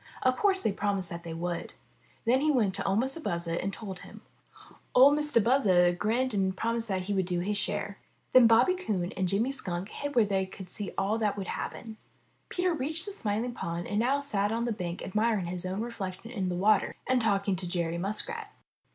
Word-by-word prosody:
Of 255 0 +3
course 385 +1 +2
they - - +2
promised 195 -2 -1
that 170 0 -5
they 165 -1 -6
would. 175 0 -4 0.5
Then 250 +4 +3
he 310 - +2
went 230 -9 +2
to - - -3
01' 195 +2 +1
Mistah 270 +5 -2
Buzzard 170 -3 -1
and 195 - -2
told 195 -4 -7
him. - - -12 0.7
Or 265 +3 +8
Mistah 295 -5 +3
Buzzard 185 -9 +4
grinned 240 +4 +1
and 190 -2 0
promised 230 0 -1
that 190 -3 -1
he 195 +3 -3
would 190 -2 0
do 175 -1 0
his 205 +3 -1
share. 205 0 -2 0.3
Then 255 -2 +8
Bobby 230 +11 +5
Coon 200 - -2
and 190 -1 0
Jimmy 215 +8 +1
Skunk 190 -7 -3
hid 285 +4 -5
where 235 -3 +5
they 195 -2 0
could 190 -1 -10
see 205 -3 -3
all 210 +3 +1
that 210 -2 0
would 195 - -4
happen. 220 -2 -5 0.5
Peter 360 0 0
reached 315 +3 -2
the 410 - -5
Smiling 230 - -2
Pool 170 -4 -4
and 205 - -1
now 255 +5 +2
sat 210 -8 0
on 230 +1 -1
the 240 - -1
bank 180 -5 -4
admiring 215 -1 0
his 180 +1 -4
own 190 +3 -3
reflection 225 -2 -6
in 195 -6 -2
the 180 - -2
water 205 +3 +3
and 255 -1 +3
talking 200 -3 +1
to 180 - -3
Jerry 170 -1 -1
Muskrat. 410 - -2
205 Hz, 210 wpm, -29 LUFS, 185-245 Hz, 0.7 s, Or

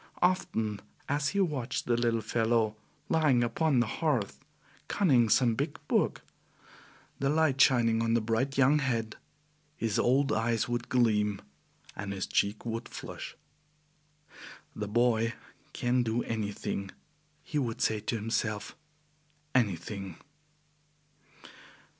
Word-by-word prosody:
Often 110 - 0 0.3
as 145 +1 0
he 200 - 0
watched 135 -8 -1
the 120 - +2
little 115 -1 +1
fellow 110 -1 +1 0.3
lying 150 -7 +3
upon 130 +3 +1
the - - +2 0.2
hearth, 135 -11 0 0.4
conning 130 - +3
some 120 0 +4
big 140 +6 -2
book, - - +1 1.0
the 135 - +1
light 150 -3 +2
shining 115 -4 +4
on 115 0 +2
the - - +4
bright 115 +5 -1
young 140 +3 +5
head, 115 -5 -1 0.6
his 110 -2 0
old 135 +3 +3
eyes 115 -2 +1
would 120 0 -3
gleam 105 -5 +2 0.6
and 100 0 -4
his 95 -1 -3
cheek 100 +3 0
would 115 0 -4
flush. - - -8 1.4
"The 105 - -4
boy 115 +1 +2 0.4
can 125 +1 +1
do 115 0 0
anything," 105 -2 -3 0.5
he 150 - -2
would 120 -5 -2
say 110 -1 +1
to 110 +3 -2
himself, 105 -1 -2 0.8
"anything!" 95 -5 -1
115 Hz, 120 wpm, -30 LUFS, 110-135 Hz, 1.4 s, young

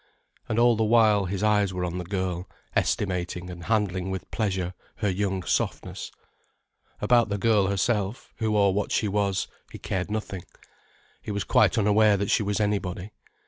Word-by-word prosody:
And 110 - -1
all 120 0 +5
the 110 - +1
while 110 -3 +4
his 95 +2 -3
eyes 105 -3 +2
were 90 0 -1
on 90 +1 -3
the - - -3
girl, 95 -1 -3 0.3
estimating 90 -2 -1
and 85 -1 -9
handling 95 -4 0
with 95 -1 -5
pleasure 95 -4 -1 0.2
her 105 -2 -1
young 95 -1 -1
softness. - - -2 0.9
About 120 -2 +4
the 100 - -1
girl 105 -2 +3
herself, 100 +3 -1
who 110 -2 0
or 100 -2 +4
what 100 +1 -1
she 110 - +1
was, 100 -2 0 0.2
he - - -8
cared 95 0 -3
nothing, 105 -3 -4 0.8
he - - -8
was 100 -1 -1
quite - - +3
unaware 105 0 +4
that 100 0 -1
she - - +3
was 105 0 -1
anybody. 100 -2 -1
100 Hz, 170 wpm, -26 LUFS, 95-105 Hz, 0.9 s, all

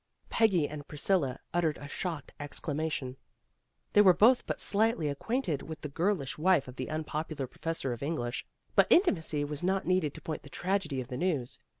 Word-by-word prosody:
Peggy 190 -9 +3
and 145 -1 -8
Priscilla 150 -3 0 0.2
uttered 165 -3 +1
a 145 - -8
shocked 160 -1 -4
ex 145 -1 -5
clamation. 150 -4 -2 0.8
They 205 - +8
were 185 -3 +7
both 245 +4 +5
but - - -2
slightly 210 -7 +2
ac 140 - -3
quainted 225 - -1
with 160 -1 -8
the 150 - -4
girlish 155 -4 -1
wife 170 -4 +3
of 125 0 -10
the 130 - -3
unpopu 155 0 -3
lar 135 - 0
professor 150 -1 -3
of 120 - -8
English, 135 -5 -2 0.3
but - - +5
intimacy 160 - +3
was 150 0 -5
not 190 +2 +1
needed 180 -6 +1
to - - -8
point 155 - -4
the - - -13
tragedy 180 -8 -1
of 125 - -9
the 125 - -4
news. 145 -7 -1
155 Hz, 195 wpm, -31 LUFS, 140-185 Hz, 0.8 s, They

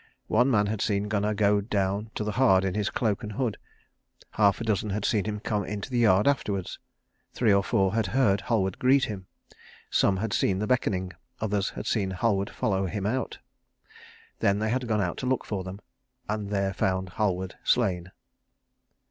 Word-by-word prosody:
One 125 +5 +4
man 105 -5 +3
had 105 0 -2
seen 100 -1 0
Gunnar 105 0 0
go 105 0 +3
down 100 0 -1
to - - -2
the 105 - -2
hard 100 -5 +4
in 95 - -1
his 105 0 0
cloak 110 -5 -1
and 105 0 -6
hood; 120 -1 -2 0.7
half 100 -2 +3
a - - -3
dozen 110 -1 0
had 100 +1 -2
seen 105 -4 +1
him 105 -1 -3
come 105 -1 -1
into 100 +6 -5
the 120 - +1
yard 105 -2 +4
afterwards; 100 -10 -1 0.5
three 110 -5 +3
or 100 0 +3
four 95 0 +1
had 110 -3 +1
heard 105 -2 +2
Halward 95 -5 0
greet 130 +1 +4
him; 95 -4 -7 0.6
some 95 - +3
had 110 +2 -2
seen 95 - +2
the 105 - -1
beckoning, 95 -6 0 0.3
others 105 -2 0
had - - -7
seen 95 -4 0
Halward 100 0 0
follow 95 -2 -1
him 100 +1 -4
out. 130 +5 -2 1.0
Then 100 0 +2
they 110 +1 -1
had 125 0 -1
gone 110 -2 +1
out 90 -3 -2
to 125 - -3
look 130 -1 0
for 100 -3 -3
them, 95 +2 -7 0.5
and 105 -1 -3
there 100 -1 0
found 95 -1 -1
Halward 95 -2 -1
slain. 95 -7 +1
105 Hz, 190 wpm, -27 LUFS, 95-110 Hz, 1.0 s, One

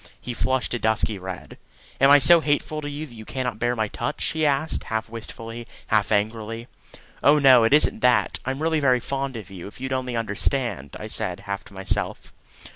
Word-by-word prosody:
He 125 - -6
flushed 130 +1 -1
a 120 - -2
dusky 110 -2 0
red. 95 -1 -8 0.4
"Am 135 - +5
I 145 - +9
so 170 +4 +8
hateful 155 0 -1
to 145 - -5
you 145 +2 -5
that 130 - -15
you 110 -1 -10
cannot 125 -1 -4
bear 120 +1 0
my 110 -2 -1
touch?" 120 +4 -4
he 155 -1 0
asked 145 +3 -1
half 110 0 -3
wistfully, 115 +1 -8 0.2
half 105 -1 +1
angrily. 110 +2 -2 0.5
"Oh 145 +2 +5
no; 130 -5 +6
it 115 - +2
isn't 150 - +5
that. 125 +1 +2
I'm 135 +3 -3
really 160 -1 +1
very 130 -3 +3
fond 135 +1 -4
of 105 -3 -9
you, 95 -2 -8
if 105 - -13
you'd 130 0 -4
only 130 -2 -3
understand," 115 - -2
I - - -7
said 90 -1 -1
half 100 0 -5
to 100 - -16
myself. 95 0 -3
120 Hz, 200 wpm, -23 LUFS, 110-135 Hz, 0.5 s, I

